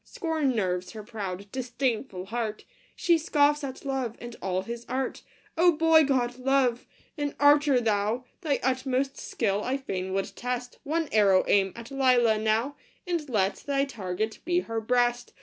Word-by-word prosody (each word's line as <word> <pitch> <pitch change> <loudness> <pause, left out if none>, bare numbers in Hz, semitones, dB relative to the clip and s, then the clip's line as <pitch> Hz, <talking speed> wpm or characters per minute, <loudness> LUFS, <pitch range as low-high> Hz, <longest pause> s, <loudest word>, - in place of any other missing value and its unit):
Scorn 320 - -1
nerves 180 -3 -1
her 215 -1 -7
proud, 200 -3 -6
disdainful 245 -6 -2
heart! 220 0 -4 0.3
She 340 -2 +3
scoffs 295 -2 +2
at 265 0 -6
Love 265 -4 -2
and 240 0 -8
all 185 0 -1
his 235 +2 -6
art! 260 +1 -2 0.3
Oh, 345 +1 +5
boy 320 0 +5
god, 250 -2 0
Love! 255 -2 +1 0.3
An 290 -1 -2
archer 290 -2 +5
thou! 220 +2 0 0.2
Thy 295 -5 0
utmost 260 +1 0
skill 205 -3 -1
I 260 +2 0
fain 190 -8 -4
would 195 0 -2
test; 245 0 -4
One 320 +2 -1
arrow 200 -3 +4
aim 195 -1 +3
at 235 +3 -10
Lelia 250 -5 +3
now, 225 +6 0 0.3
And 340 -5 -2
let 200 -4 +1
thy 275 -1 0
target 215 -3 -4
be 355 +1 +1
her 225 -5 -3
breast 245 +1 +1
245 Hz, 160 wpm, -27 LUFS, 215-280 Hz, 0.3 s, Oh